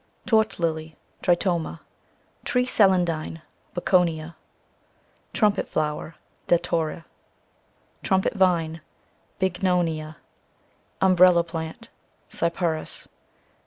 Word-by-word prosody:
Torch 220 Hz, -2 st, +2 dB
Lily, 160 Hz, -2 st, -2 dB, 0.2 s
cc 175 Hz, -1 st, +3 dB
Tritoma. 170 Hz, -3 st, -2 dB, 0.6 s
Tree 250 Hz, 0 st, +1 dB
Celandine, 180 Hz, -9 st, +2 dB
cc 165 Hz, -, -14 dB, 0.3 s
Bocconia. 170 Hz, -3 st, +1 dB, 1.0 s
Trumpet 210 Hz, -2 st, +1 dB
Flower, 155 Hz, +1 st, -2 dB
CI -, -, -33 dB, 0.3 s
Datura. 165 Hz, -1 st, 0 dB, 1.0 s
Trumpet 190 Hz, -1 st, +1 dB
Vine, 170 Hz, -5 st, +1 dB, 0.6 s
cc 190 Hz, -1 st, +2 dB
Bignonia. 170 Hz, -4 st, -1 dB, 0.9 s
Umbrella 185 Hz, -2 st, +6 dB
Plant, 160 Hz, -1 st, -7 dB, 0.4 s
cc -, -, -11 dB, 0.2 s
Cyperus. 165 Hz, -3 st, -3 dB
170 Hz, 90 wpm, -24 LUFS, 160-185 Hz, 1.0 s, Umbrella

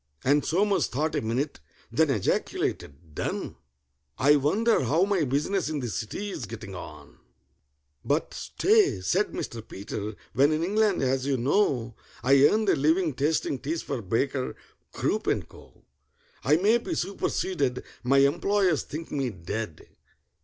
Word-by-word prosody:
And 145 Hz, +2 st, +3 dB
SOMERS 195 Hz, +4 st, +2 dB
thought 150 Hz, +5 st, -1 dB
a -, -, 0 dB
minute, 125 Hz, +6 st, -2 dB, 0.3 s
then 160 Hz, -1 st, +3 dB
ejaculated, 80 Hz, -, -2 dB
"Done! -, -, -3 dB, 0.6 s
I 145 Hz, +3 st, +5 dB
wonder 200 Hz, -, +2 dB
how 160 Hz, +9 st, +3 dB
my 195 Hz, -5 st, +1 dB
business 150 Hz, +7 st, 0 dB
in 155 Hz, -2 st, -2 dB
the 125 Hz, -3 st, -3 dB
City's 125 Hz, -, -4 dB
getting 110 Hz, -2 st, -8 dB
on?" 90 Hz, -, -10 dB, 0.8 s
"But 145 Hz, +3 st, 0 dB
stay," 420 Hz, -1 st, +2 dB
said 420 Hz, -, +1 dB
Mr. 115 Hz, -, -5 dB
PETER: 105 Hz, 0 st, -6 dB, 0.2 s
"when 140 Hz, +4 st, +4 dB
in 155 Hz, +1 st, 0 dB
England, 205 Hz, -2 st, +2 dB
as 130 Hz, 0 st, 0 dB
you 135 Hz, -2 st, +1 dB
know, 125 Hz, -, +1 dB, 0.3 s
I 135 Hz, +3 st, +6 dB
earned 215 Hz, +4 st, +1 dB
a -, -, +5 dB
living 160 Hz, +3 st, +2 dB
tasting 145 Hz, 0 st, 0 dB
teas 160 Hz, +5 st, -3 dB
for 135 Hz, -4 st, -3 dB
BAKER, 125 Hz, +6 st, -1 dB, 0.4 s
CROOP, -, -, -1 dB
AND -, -, 0 dB
CO., -, -, -18 dB, 0.6 s
I 150 Hz, -, +4 dB
may 210 Hz, +8 st, +3 dB
be -, -, -4 dB
superseded—my 140 Hz, -8 st, -1 dB
employers 175 Hz, +4 st, +3 dB
think 160 Hz, +2 st, -7 dB
me 135 Hz, -3 st, -1 dB
dead!" 95 Hz, -2 st, -6 dB
145 Hz, 140 wpm, -27 LUFS, 125-175 Hz, 0.8 s, I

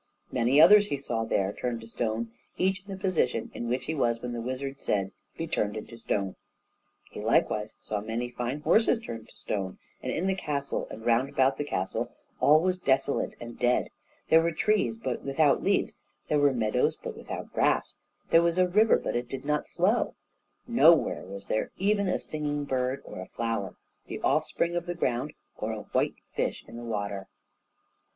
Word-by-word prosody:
Many 125 Hz, +3 st, +3 dB
others 205 Hz, +6 st, +8 dB
he 145 Hz, -, -1 dB
saw 115 Hz, -5 st, -2 dB
there 100 Hz, -2 st, 0 dB
turned 120 Hz, -2 st, -3 dB
to 115 Hz, -, -10 dB
stone, 115 Hz, 0 st, -2 dB, 0.3 s
each 190 Hz, 0 st, +1 dB
in 200 Hz, -, -10 dB
the 190 Hz, -, -4 dB
position 165 Hz, -, 0 dB
in 120 Hz, -, -4 dB
which 125 Hz, +2 st, -1 dB
he 160 Hz, -, -2 dB
was 120 Hz, -6 st, +1 dB
when 125 Hz, +1 st, -5 dB
the 120 Hz, -, -3 dB
wizard 135 Hz, +3 st, -4 dB
said, 95 Hz, -2 st, 0 dB, 0.3 s
"Be 165 Hz, -, -2 dB
turned 105 Hz, -9 st, -1 dB
into 110 Hz, +2 st, -8 dB
stone." 100 Hz, -4 st, -2 dB, 0.7 s
He -, -, -7 dB
likewise 105 Hz, 0 st, +1 dB
saw 105 Hz, -1 st, -3 dB
many 115 Hz, +3 st, -2 dB
fine 125 Hz, +4 st, -3 dB
horses 225 Hz, +7 st, +4 dB
turned 115 Hz, -, -8 dB
to -, -, -17 dB
stone, 95 Hz, -3 st, -3 dB, 0.2 s
and -, -, -2 dB
in 175 Hz, -, -1 dB
the 190 Hz, -, +2 dB
castle 145 Hz, -6 st, -2 dB
and 110 Hz, +1 st, -9 dB
round 120 Hz, +4 st, +2 dB
the 135 Hz, +2 st, +3 dB
castle 95 Hz, -10 st, -2 dB, 0.3 s
all 155 Hz, +2 st, +6 dB
was 185 Hz, +1 st, 0 dB
desolate 135 Hz, -3 st, +1 dB
and 120 Hz, 0 st, -9 dB
dead; 125 Hz, 0 st, +2 dB, 0.4 s
there 160 Hz, -, +7 dB
were 170 Hz, +1 st, +1 dB
trees, 215 Hz, +6 st, +1 dB
but 230 Hz, -, -3 dB
without 140 Hz, +1 st, +3 dB
leaves; -, -, +1 dB, 0.3 s
there 150 Hz, -, +3 dB
were 145 Hz, -1 st, +5 dB
meadows, 110 Hz, -4 st, +1 dB
but -, -, -7 dB
without -, -, -7 dB
grass; -, -, +1 dB, 0.3 s
there 165 Hz, -, +7 dB
was 170 Hz, +1 st, +1 dB
a 185 Hz, 0 st, +5 dB
river 210 Hz, +5 st, +5 dB
but -, -, -3 dB
it 120 Hz, 0 st, -2 dB
did 135 Hz, +1 st, -6 dB
not 150 Hz, 0 st, 0 dB
flow; 195 Hz, +7 st, +1 dB, 0.5 s
nowhere 170 Hz, -, +4 dB
was 100 Hz, +1 st, -8 dB
there 110 Hz, -, -1 dB
even 200 Hz, +1 st, +2 dB
a 180 Hz, -, +1 dB
singing 145 Hz, -1 st, -3 dB
bird, 130 Hz, 0 st, -1 dB
or -, -, -8 dB
a 95 Hz, -, -6 dB
flower, 115 Hz, -5 st, -2 dB, 0.3 s
the -, -, -5 dB
offspring 170 Hz, +1 st, +1 dB
of 175 Hz, 0 st, -2 dB
the 175 Hz, -, -2 dB
ground, 125 Hz, -8 st, -1 dB, 0.3 s
or -, -, -2 dB
a -, -, -4 dB
white -, -, +1 dB, 0.2 s
fish -, -, -2 dB
in -, -, -11 dB
the 120 Hz, -, -7 dB
water. 100 Hz, -4 st, -3 dB
135 Hz, 190 wpm, -28 LUFS, 115-170 Hz, 0.7 s, others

